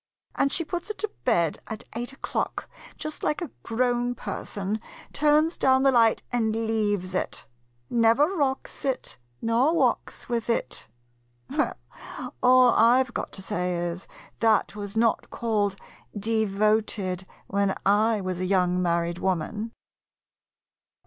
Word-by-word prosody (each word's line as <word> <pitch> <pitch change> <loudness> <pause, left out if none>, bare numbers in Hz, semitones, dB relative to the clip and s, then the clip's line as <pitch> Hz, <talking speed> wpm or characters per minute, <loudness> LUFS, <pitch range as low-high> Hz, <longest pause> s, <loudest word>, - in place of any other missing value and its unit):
And 275 - +1
she 335 - +2
puts 350 +4 -4
it 430 - -4
to 430 -1 -2
bed 170 -10 +2
at 220 - -6
eight 240 +3 -3
o'clock, 270 - -3 0.3
just 310 -1 -5
like 300 - 0
a 340 -7 -5
grown 245 +1 0
person, 205 -1 -4 0.2
— - - -19
turns 305 +3 +3
down 265 0 +4
the 270 - +5
light 230 -3 +4
and 225 -2 0
leaves 205 -4 0
it. 185 - -3 0.4
Never 230 +4 +4
rocks 275 -5 -2
it, 265 - -3 0.2
nor 245 +8 +3
walks - - 0
with 235 -2 -2
it. 230 - -2 0.6
Well, - - 0 0.7
all 255 -1 +6
I 240 +4 +5
've 245 -2 -14
got - - -4
to 190 - -7
say 180 -3 -1
is, 175 +1 -4 0.3
that 220 -2 +2
was 205 +1 -5
not 230 -1 +2
called 210 -4 0 0.3
" - - -38
devoted 210 -3 0
" - - -29
when 200 -1 +2
I 210 +2 +3
was 185 -1 -3
a 185 - -1
young 180 -1 +2
married 170 0 0
woman! 190 +5 -2
225 Hz, 145 wpm, -26 LUFS, 195-250 Hz, 0.7 s, all